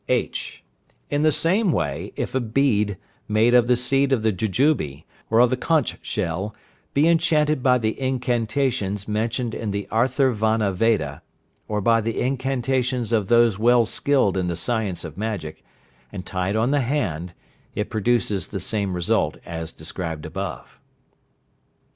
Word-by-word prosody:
(h). - - -2 0.5
In 145 0 +1
the 155 0 +4
same 185 +6 +2
way, - - -2
if - - -3
a 130 - +2
bead, 110 -5 +1 0.3
made 110 +3 +3
of 120 -1 +5
the 125 - +4
seed 135 +3 +1
of 125 -5 +2
the 110 - +3
jujube, 95 - 0 0.3
or 115 - +3
of 125 0 +5
the - - +3
conch 155 +2 +1
shell, 95 +1 -3 0.4
be 145 +3 +4
enchanted 155 -4 +2
by 125 0 +4
the 110 +1 -2
incantations 125 -5 -1
mentioned 115 +2 -1
in 110 - -3
the 100 0 -3
Atharvana 110 -4 +2
Veda, 90 -9 0 0.5
or 105 -1 -1
by 115 +2 +3
the 115 +1 -2
incantations 130 -2 -1
of 110 -4 +1
those 115 -3 +4
well 120 +1 +5
skilled 120 -4 +1
in 90 -1 0
the 85 - -1
science 100 0 -2
of 80 +2 -8
magic, 105 -8 -4 0.5
and 90 - -7
tied 95 +2 -2
on 115 +4 +2
the 145 -1 +2
hand, 95 - -2 0.4
it 105 - -3
produces 110 -2 0
the 95 - -5
same 100 0 -1
result 90 -1 0
as 80 -1 -5
described 80 -1 -6
above. 95 +4 -6
115 Hz, 155 wpm, -23 LUFS, 100-130 Hz, 0.5 s, of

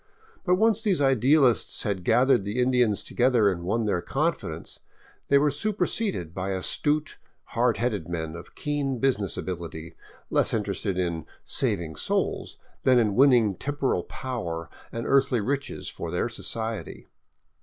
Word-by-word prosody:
But 180 -1 +3
once 220 +2 +3
these 200 -7 +2
idealists 135 -1 +3
had 100 -4 -2
gathered 125 +2 +4
the 100 +4 -4
Indians 125 -4 +2
together 120 -5 +3
and 85 -2 -4
won 110 +6 0
their 100 -4 0
confidence, - - -2 0.5
they 140 - +5
were 145 +1 +3
superseded 195 - -1
by 95 +1 -2
astute, 150 +11 -1 0.3
hard 120 0 +2
headed 105 -9 -2
men 80 -2 -3
of 85 - -11
keen 145 -3 -1
business 115 -7 0
ability, 85 -2 -6 0.4
less - - +2
interested 100 -2 -2
in 85 -4 -2
" - - -41
saving 80 -3 -1
souls - - -1
" - - -36
than 130 -1 +5
in 110 -4 +3
winning 120 -4 +5
temporal 135 -2 -1
power 85 -11 -5 0.2
and 115 0 -4
earthly 135 -3 +3
riches 140 +7 -3
for 85 - -5
their 90 +7 -1
society. 110 0 -4
115 Hz, 145 wpm, -26 LUFS, 95-135 Hz, 0.5 s, they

